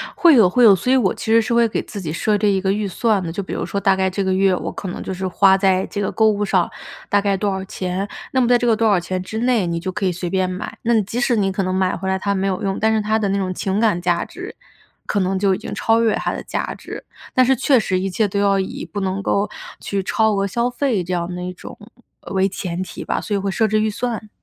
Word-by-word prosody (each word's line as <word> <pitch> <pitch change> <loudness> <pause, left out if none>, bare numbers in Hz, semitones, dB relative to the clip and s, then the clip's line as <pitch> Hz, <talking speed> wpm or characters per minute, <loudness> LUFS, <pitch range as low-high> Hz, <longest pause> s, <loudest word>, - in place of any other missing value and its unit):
会 340 -2 +6
有， 215 -7 +6
会 250 +5 +3
有， 215 -4 +9
所 250 +8 -1
以 - - +5
我 230 -8 +2
其 - - -8
实 225 +1 +4
是 225 +2 -2
会 235 0 +4
给 220 - -2
自 205 - -8
己 160 -5 -4
设 210 +4 +1
置 210 - +1
一 195 -1 +1
个 190 0 +1
预 205 0 -1
算 210 +2 +1
的。 165 -2 -4
就 200 +3 -4
比 - - -9
如 - - -2
说 200 +3 -3
大 195 -1 +3
概 190 0 +1
这 195 +2 -2
个 190 0 0
月 190 0 +3
我 - - -4
可 195 - -7
能 180 - -5
就 - - -4
是 185 +1 -3
花 190 +1 +4
在 190 -1 +2
这 205 - -4
个 195 - -1
购 220 0 +3
物 205 -1 0
上 185 -3 +1 0.4
大 205 - +3
概 200 -1 +1
多 200 +1 -1
少 190 0 -3
钱， 185 +1 -3 0.2
那 260 - +1
么 245 - +3
在 245 0 +5
这 240 - -2
个 230 -2 +4
多 225 0 +1
少 200 -4 +4
钱 185 +1 -3
之 220 +4 -5
内 235 -6 +1
你 170 0 -2
就 185 +2 -4
可 200 +1 -3
以 185 - +2
随 175 0 -4
便 185 0 0
买。 185 +3 -6
那 235 +1 +2
你 220 - +4
即 225 +5 -4
使 245 0 +2
你 195 -3 +1
可 195 +1 -1
能 185 0 -1
买 185 -1 +1
回 190 - -5
来 190 0 +1
它 200 +1 -1
没 195 0 -1
有 185 -1 -2
用， 195 -1 -1
但 220 +1 +2
是 215 - +1
它 215 +1 +1
的 210 - 0
那 200 - 0
种 185 -1 -2
情 190 +2 -2
感 215 -6 +2
价 175 -1 +1
值 365 +3 -9 0.5
可 205 - -1
能 190 0 0
就 195 0 +2
已 - - -1
经 - - -7
超 225 0 +2
越 225 -2 +2
它 - - -2
的 - - -5
价 - - -3
值， - - -9 0.3
但 255 - +4
是 265 +1 +3
确 265 +2 +3
实 185 -3 0
一 195 - -2
切 210 +3 +1
都 200 +1 -2
要 200 -1 +3
以 190 - -4
不 205 - -5
能 190 +1 -2
够 200 +1 0 0.3
去 200 -1 -2
超 220 +3 +1
额 200 0 0
消 235 +5 0
费 245 -6 -1
这 180 +2 -4
样 175 0 -2
的 180 - -5
一 180 - -5
种 - - -11 0.4
呃， - - -10
为 190 0 +2
前 185 -2 -4
提 185 - -6
吧， - - -1
所 210 - -3
以 - - +2
会 195 0 -2
设 220 +3 +1
置 215 0 +1
预 220 - +1
算。 220 -1 -4
195 Hz, 325 characters per minute, -20 LUFS, 185-220 Hz, 0.5 s, 有